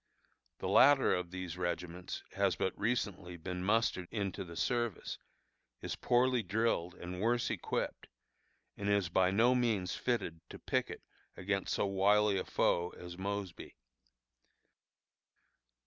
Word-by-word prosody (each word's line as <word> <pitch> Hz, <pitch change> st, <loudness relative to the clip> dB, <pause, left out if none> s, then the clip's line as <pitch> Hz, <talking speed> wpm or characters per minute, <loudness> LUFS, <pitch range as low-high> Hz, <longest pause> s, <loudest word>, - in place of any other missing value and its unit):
The -, -, -4 dB
latter 140 Hz, -1 st, +6 dB
of 90 Hz, -1 st, -2 dB
these 90 Hz, -1 st, -6 dB
regiments 90 Hz, 0 st, -4 dB
has 100 Hz, -2 st, +2 dB
but 95 Hz, -, -1 dB
recently 100 Hz, -6 st, -2 dB
been 90 Hz, +2 st, -5 dB
mustered 105 Hz, -3 st, +1 dB
into 100 Hz, -4 st, -3 dB
the 85 Hz, -2 st, -10 dB
service, 120 Hz, +3 st, -1 dB, 0.6 s
is -, -, -4 dB
poorly 125 Hz, 0 st, +2 dB
drilled 100 Hz, -4 st, 0 dB
and 90 Hz, +1 st, -6 dB
worse 120 Hz, +2 st, +1 dB
equipped, -, -, -3 dB, 0.7 s
and 100 Hz, 0 st, -3 dB
is 100 Hz, -3 st, +2 dB
by 90 Hz, +1 st, +3 dB
no 115 Hz, +6 st, +4 dB
means 110 Hz, -8 st, +1 dB
fitted 95 Hz, -10 st, -2 dB
to -, -, -8 dB
picket -, -, -2 dB, 0.3 s
against 100 Hz, +1 st, -1 dB
so -, -, +1 dB
wily 100 Hz, +1 st, +3 dB
a -, -, -4 dB
foe 85 Hz, +1 st, +1 dB
as 90 Hz, 0 st, -8 dB
Mosby. 100 Hz, -1 st, -5 dB
95 Hz, 130 wpm, -34 LUFS, 90-110 Hz, 0.7 s, latter